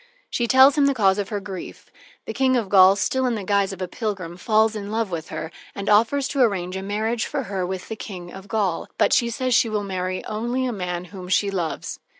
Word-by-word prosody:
She 240 - 0
tells 265 +3 +6
him 280 - +5
the 280 - +1
cause 195 -3 +3
of 200 - -3
her 210 -2 -2
grief. 195 -2 -9 0.3
The - - -5
King 260 -1 +2
of 225 -6 -1
Gaul, 190 -1 +7
still 260 +5 0
in 240 - 0
the 210 - -4
guise 200 0 +1
of 190 -1 -5
a - - -3
pilgrim, 190 -6 -4
falls 220 +3 +2
in 205 -1 -5
love 220 -3 -1
with 165 -2 -5
her, 160 - -5 0.2
and 200 0 -5
offers 230 +6 +3
to 280 - 0
arrange 190 -6 +1
a 190 - -3
marriage 220 +4 -1
for 285 -2 -2
her 190 -4 -3
with 185 -1 -5
the 220 - -5
King 180 -5 -8
of 195 +1 -10
Gaul, 205 -7 -1
but - - +3
she 235 - +3
says 255 +2 -1
she 230 - +4
will 210 -1 -1
marry 185 -1 -3
only 240 +4 -2
a 250 - -2
man 180 -3 -4
whom 185 -2 -8
she 200 +2 +2
loves. 175 -5 -3
205 Hz, 240 wpm, -23 LUFS, 190-235 Hz, 0.3 s, Gaul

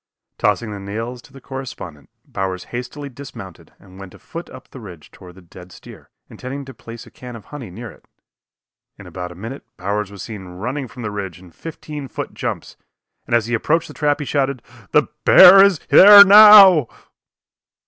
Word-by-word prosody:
Tossing 115 -3 -1
the 100 - -8
nails 115 +5 -7
to 140 - -21
the 135 - -15
correspondent, 125 - -10 0.2
Bowers 95 -1 -6
hastily 125 +4 -7
dismounted 125 -9 -13
and 95 -1 -18
went 95 -2 -13
afoot 170 +1 -11
up - - -14
the 130 - -14
ridge 90 -9 -14
toward 90 -1 -16
the 95 - -18
dead 90 +1 -16
steer, - - -16 0.2
intending 135 +2 -9
to 135 - -12
place 115 0 -13
a - - -18
can 125 -1 -12
of 110 - -13
honey 140 -8 -11
near 115 +5 -10
it. - - -23 0.9
In - - -14
about 90 -1 -9
a - - -13
minute 115 +9 -10
Bowers 100 +2 -4
was 100 -1 -11
seen 105 -5 -10
running 125 +10 -6
from 120 - -12
the 105 - -5
ridge 95 -5 -7
in 90 -1 -18
fifteen 150 - -10
foot - - -8
jumps, - - -7 0.5
and 120 - 0
as 115 -2 0
he 120 - -6
approached 160 +8 -1
the - - -11
trap 145 -1 -1
he 150 - -6
shouted: 140 -3 -3 0.3
"The - - +2 0.2
bear 195 +2 +8
is 200 -4 +2
there 200 +1 +9
now!" 200 - +7
120 Hz, 190 wpm, -18 LUFS, 95-140 Hz, 0.9 s, there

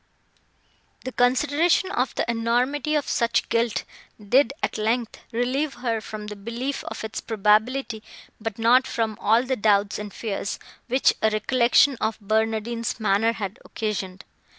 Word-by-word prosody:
The 260 - -3
consideration 290 +9 +2
of 250 -6 -1
the - - 0
enormity 245 +6 0
of 295 - 0
such 230 0 +1
guilt 230 -1 +1 0.4
did, 250 +8 +3
at - - -1
length, 225 +2 -1
relieve 260 +5 -1
her 235 -2 -2
from 215 -1 -7
the 210 0 -7
belief 235 +7 -4
of - - -6
its 220 -1 -4
probability, 220 +3 +1 0.4
but 220 -1 -4
not 245 +3 +4
from 225 -2 -1
all 225 +4 +4
the 260 0 -1
doubts 205 -2 +2
and 210 -1 -6
fears, 205 -2 -4 0.3
which 260 +2 +3
a 220 - +4
recollection 245 +5 +3
of 220 0 -1
Barnardine's 220 +2 -1
manner 215 +2 +2
had 200 -1 -5
occasioned. 195 -4 -4
230 Hz, 145 wpm, -24 LUFS, 215-255 Hz, 0.4 s, not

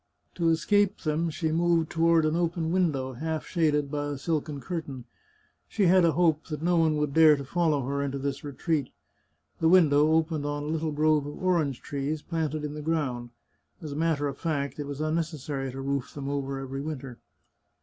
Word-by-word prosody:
To 170 -2 +1
escape 200 +5 +2
them 160 +1 0
she 160 0 -2
moved 165 -1 +2
toward 165 -1 +3
an 155 +1 +1
open 170 -1 -1
window, 150 -8 0
half 160 +4 -3
shaded 150 -5 +1
by 145 -1 -2
a 145 -1 -3
silken 150 0 -2
cur 165 +6 -3
tain. 135 -5 -9 0.6
She 210 - -1
had 185 +1 +5
a 165 -2 +4
hope 165 -3 +2
that 155 -1 -5
no 175 +1 +2
one 160 -2 +3
would 150 -2 -1
dare 160 -1 +7
to 140 - -6
follow 155 -3 +1
her 140 +1 -1
into 140 -1 -2
this 140 0 -3
retreat. 145 0 -2 0.7
The 160 - +3
window 155 -4 +5
opened 160 -2 +1
on 145 0 -3
a - - -5
little 160 0 -1
grove 150 -1 +2
of 145 - -7
orange 160 -8 +1
trees, 145 +2 -3
planted 155 -2 -2
in 150 - -5
the 150 - -6
ground; 145 -7 -2 0.5
as 155 -3 -7
a - - -5
matter 155 -2 +1
of 140 -1 -6
fact, 140 -4 -2
it 145 - -4
was 145 +1 -5
necessary 155 -4 -2
to 135 +1 -6
roof 140 -1 -3
them 140 -2 -5
over 140 -1 -2
every 135 0 -5
winter. 135 -5 -6
150 Hz, 200 wpm, -27 LUFS, 140-165 Hz, 0.7 s, dare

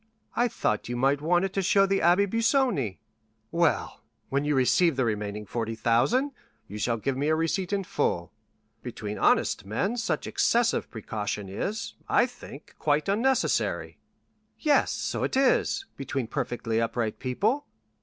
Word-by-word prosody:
"I 240 - +3
thought 105 - -1
you 120 - -2
might 135 +3 +2
want 175 +4 +2
it 195 - -4
to 195 - 0
show 195 +1 +4
the 195 0 +1
Abbé 175 +4 +4
Busoni." 225 - +1 0.5
"Well, 170 -2 +1 0.3
when 140 +1 0
you 150 0 +1
receive 145 +5 +3
the 130 -1 +1
remaining 105 -1 -3
40,000, 115 - +1 0.4
you 105 - -7
shall 115 +2 0
give 130 +4 -2
me 140 +3 -1
a 155 - +3
receipt 170 +4 -1
in 200 -1 0
full. 85 - -1 0.5
Between 105 0 -6
honest - - +2
men 115 - -1
such 230 - -1
excessive 235 0 +1
precaution 105 -2 -4
is, 205 - -3 0.2
I - - +4
think, 240 - -12
quite 150 +2 +1
unnecessary." 235 +7 0 0.6
"Yes, 300 -2 +3
so - - -2
it - - 0
is, 270 +8 +2
between 135 -2 -3
perfectly 115 -3 -2
upright 115 -1 -2
people." 210 - 0
150 Hz, 150 wpm, -27 LUFS, -, 0.6 s, show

